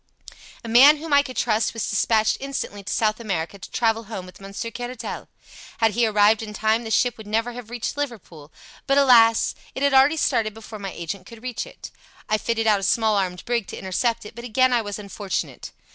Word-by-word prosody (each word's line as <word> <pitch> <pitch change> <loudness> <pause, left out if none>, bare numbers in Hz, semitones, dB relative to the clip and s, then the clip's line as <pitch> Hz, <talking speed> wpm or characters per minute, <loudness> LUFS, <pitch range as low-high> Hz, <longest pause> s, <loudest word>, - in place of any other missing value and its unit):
"A - - -7
man 265 +7 +7
whom 310 0 -4
I 285 - +7
could 255 -3 -8
trust 220 -1 +1
was 225 - -2
dispatched 215 +1 +2
instantly 270 -7 -5
to - - -5
South 215 0 +1
America 195 -4 -3
to - - -10
travel 225 -1 0
home 195 -4 -6
with 185 +1 -14
Monsieur 200 +4 -6
Caratal. 245 0 -6 0.5
Had 225 -1 +3
he 235 +2 +2
arrived 210 +1 +4
in 215 -1 -7
time 220 +2 +1
the 225 - -6
ship 245 0 +1
would 215 - -10
never 225 +3 0
have 240 -2 -9
reached 240 -1 -4
Liverpool; 205 - -6 0.4
but 275 0 +3
alas! 235 -5 +5 0.2
it 265 - -3
had 280 -1 +3
already 270 +4 +5
started 215 -7 0
before 220 -1 -10
my 195 -1 -5
agent 175 +3 -6
could 230 0 -13
reach 255 -2 -4
it. - - -11 0.4
I 215 0 +1
fitted 225 0 -1
out 210 -2 +4
a - - -7
small 220 +2 +2
armed 180 -3 -2
brig 235 -4 -1
to - - -7
intercept 230 +4 -1
it, 210 - -10
but 235 +1 -9
again 255 +2 +2
I 240 - +3
was 205 -2 -5
unfortunate. 200 -1 -5
225 Hz, 215 wpm, -23 LUFS, 205-245 Hz, 0.5 s, man